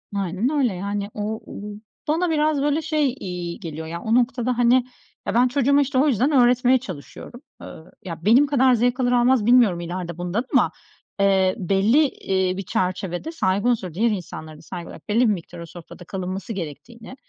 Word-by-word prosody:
Aynen 195 Hz, +4 st, -1 dB
öyle. 275 Hz, -8 st, +1 dB
Yani 200 Hz, +2 st, -3 dB
o 215 Hz, +1 st, -4 dB
o -, -, -8 dB, 0.5 s
bana 335 Hz, +4 st, +1 dB
biraz 305 Hz, -2 st, +1 dB
böyle 295 Hz, +2 st, +1 dB
şey 305 Hz, -4 st, 0 dB
iyi 175 Hz, -2 st, -5 dB
geliyor: 160 Hz, -1 st, -7 dB
Ya, 170 Hz, +1 st, -6 dB
o 220 Hz, +1 st, +1 dB
noktada, 250 Hz, 0 st, +1 dB
hani, 240 Hz, 0 st, +4 dB, 0.5 s
ya, -, -, -1 dB
ben 245 Hz, +2 st, +4 dB
çocuğuma 280 Hz, +2 st, +3 dB
işte 275 Hz, -1 st, -1 dB
o 280 Hz, +4 st, +4 dB
yüzden 265 Hz, +2 st, +2 dB
öğretmeye 250 Hz, -1 st, +4 dB
çalışıyorum. 220 Hz, -, -10 dB, 0.2 s
Iıı, 160 Hz, -, -11 dB
ya, 165 Hz, -2 st, -7 dB
benim 250 Hz, +7 st, +5 dB
kadar 265 Hz, -2 st, +4 dB
zevk 245 Hz, +2 st, +1 dB
alır 245 Hz, -1 st, +1 dB
almaz 245 Hz, -2 st, +3 dB
bilmiyorum 235 Hz, -7 st, +5 dB
ileride 175 Hz, 0 st, -5 dB
bundan 180 Hz, +8 st, -2 dB
ama, -, -, +4 dB, 0.5 s
eee, 190 Hz, -1 st, +3 dB
belli, 205 Hz, -, +3 dB
iii, 190 Hz, -6 st, -1 dB
bir 195 Hz, -, -4 dB
çerçevede 185 Hz, -, -2 dB
saygı 200 Hz, -, 0 dB
unsuru, 195 Hz, -8 st, -1 dB
diğer 225 Hz, +7 st, +2 dB
insanlara 160 Hz, -5 st, -6 dB
da -, -, -15 dB
saygı 170 Hz, +1 st, -8 dB
olarak -, -, -13 dB
belli 215 Hz, +3 st, +2 dB
bir 225 Hz, -4 st, +4 dB
miktar 175 Hz, -1 st, -8 dB
o 170 Hz, -, -7 dB
sofrada 175 Hz, +1 st, -12 dB
kalınması 190 Hz, +5 st, -5 dB
gerektiğini 220 Hz, -, -8 dB
215 Hz, 185 wpm, -22 LUFS, 180-255 Hz, 0.5 s, benim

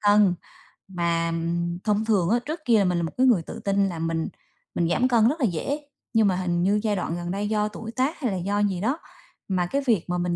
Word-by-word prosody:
cân, 205 Hz, -3 st, +5 dB, 0.5 s
mà 170 Hz, -2 st, 0 dB, 0.5 s
thông 210 Hz, 0 st, +1 dB
thường 195 Hz, -6 st, +2 dB
á, 235 Hz, +3 st, +3 dB
trước 315 Hz, +3 st, -4 dB
kia 230 Hz, -4 st, +5 dB
là 200 Hz, -, +3 dB
mình 180 Hz, -1 st, +1 dB
là 170 Hz, -, 0 dB
một 165 Hz, -, -3 dB
cái 260 Hz, +1 st, +4 dB
người 210 Hz, -9 st, +4 dB
tự -, -, -8 dB
tin 200 Hz, -1 st, +1 dB
là 165 Hz, -2 st, -5 dB
mình 165 Hz, 0 st, -1 dB, 0.5 s
mình 170 Hz, -, +1 dB
giảm 245 Hz, +8 st, +2 dB
cân 235 Hz, -3 st, +4 dB
rất 305 Hz, +4 st, -2 dB
là 250 Hz, -, +2 dB
dễ, 215 Hz, -, -1 dB, 0.3 s
nhưng 220 Hz, -2 st, +4 dB
mà 185 Hz, -, +2 dB
hình 175 Hz, -1 st, 0 dB
như 205 Hz, +2 st, +3 dB
giai 210 Hz, -2 st, +1 dB
đoạn 175 Hz, -2 st, -2 dB
gần 175 Hz, 0 st, -4 dB
đây 205 Hz, +2 st, -2 dB
do 210 Hz, -1 st, +1 dB
tuổi 220 Hz, +2 st, -7 dB
tác 265 Hz, +6 st, -1 dB
hay 250 Hz, -8 st, -1 dB
là 190 Hz, -, -2 dB
do 200 Hz, +3 st, -1 dB
gì 195 Hz, -3 st, 0 dB
đó 260 Hz, +9 st, 0 dB, 0.5 s
mà 185 Hz, -2 st, 0 dB
cái 275 Hz, +11 st, -1 dB
việc 220 Hz, -9 st, +2 dB
mà 180 Hz, -, 0 dB
mình 175 Hz, 0 st, 0 dB
200 Hz, 255 wpm, -25 LUFS, 175-225 Hz, 0.5 s, cân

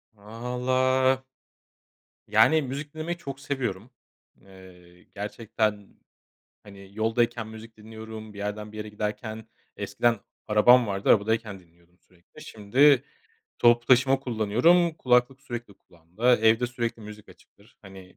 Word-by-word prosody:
Valla... 130 Hz, +4 st, 0 dB, 1.0 s
Yani, 110 Hz, +9 st, +4 dB
müzik 140 Hz, +3 st, -6 dB
dinlemeyi 165 Hz, +2 st, -4 dB
çok 140 Hz, -4 st, -8 dB
seviyorum. 130 Hz, -5 st, -4 dB, 0.5 s
Eee, 90 Hz, -2 st, -17 dB
gerçekten, 105 Hz, 0 st, -4 dB, 0.7 s
hani, 100 Hz, -1 st, -14 dB
yoldayken 115 Hz, 0 st, -1 dB
müzik 110 Hz, 0 st, -12 dB
dinliyorum, 110 Hz, 0 st, -10 dB
bir -, -, -11 dB
yerden 105 Hz, +1 st, -5 dB
bir -, -, -11 dB
yere 105 Hz, 0 st, -6 dB
giderken, 110 Hz, +1 st, -5 dB, 0.3 s
eskiden 105 Hz, +2 st, 0 dB, 0.3 s
arabam 120 Hz, +3 st, +5 dB
vardı, 100 Hz, -1 st, -3 dB
arabadayken 110 Hz, -2 st, +1 dB
dinliyordum 85 Hz, +1 st, -28 dB
sürekli. 90 Hz, -, -19 dB
Şimdi 125 Hz, +6 st, +3 dB, 0.5 s
toplu 120 Hz, 0 st, +4 dB
taşıma 135 Hz, +1 st, +4 dB
kullanıyorum, 130 Hz, +9 st, +2 dB
kulaklık 125 Hz, -1 st, +1 dB
sürekli 120 Hz, -6 st, -8 dB
kulağımda, 90 Hz, +9 st, -1 dB
evde 115 Hz, +2 st, +3 dB
sürekli 115 Hz, -1 st, -4 dB
müzik 105 Hz, 0 st, -12 dB
açıktır. 105 Hz, +4 st, -21 dB
Hani, 95 Hz, -2 st, -14 dB
110 Hz, 115 wpm, -26 LUFS, 105-125 Hz, 1.0 s, arabam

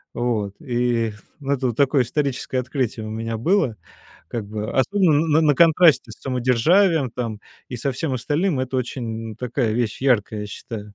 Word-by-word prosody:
Вот, 110 Hz, -5 st, -1 dB
и 120 Hz, -3 st, 0 dB, 0.3 s
это 135 Hz, -2 st, 0 dB
вот 115 Hz, -, -3 dB
такое 140 Hz, -2 st, +3 dB
историческое 135 Hz, 0 st, -2 dB
открытие 125 Hz, -4 st, -2 dB
у -, -, -6 dB
меня 115 Hz, +1 st, -3 dB
было, 130 Hz, -, +1 dB, 0.5 s
как 115 Hz, -4 st, -4 dB
бы 110 Hz, +1 st, -4 dB
особенно 160 Hz, -1 st, +3 dB
н 160 Hz, -, +3 dB
на 145 Hz, -, +4 dB
контрасте 165 Hz, -6 st, +5 dB
с -, -, -15 dB
самодержавием 135 Hz, -, +2 dB
там 110 Hz, -4 st, -4 dB, 0.3 s
и 125 Hz, -, -5 dB
со 135 Hz, +3 st, -2 dB
всем 135 Hz, +2 st, -3 dB
остальным. 145 Hz, +5 st, 0 dB
Это 130 Hz, 0 st, -2 dB
очень 115 Hz, -3 st, -4 dB
такая 125 Hz, -2 st, -1 dB
вещь 115 Hz, 0 st, -1 dB
яркая, 110 Hz, -5 st, +1 dB
я 105 Hz, -, -4 dB
считаю. 105 Hz, 0 st, -8 dB
125 Hz, 165 wpm, -22 LUFS, 115-140 Hz, 0.5 s, контрасте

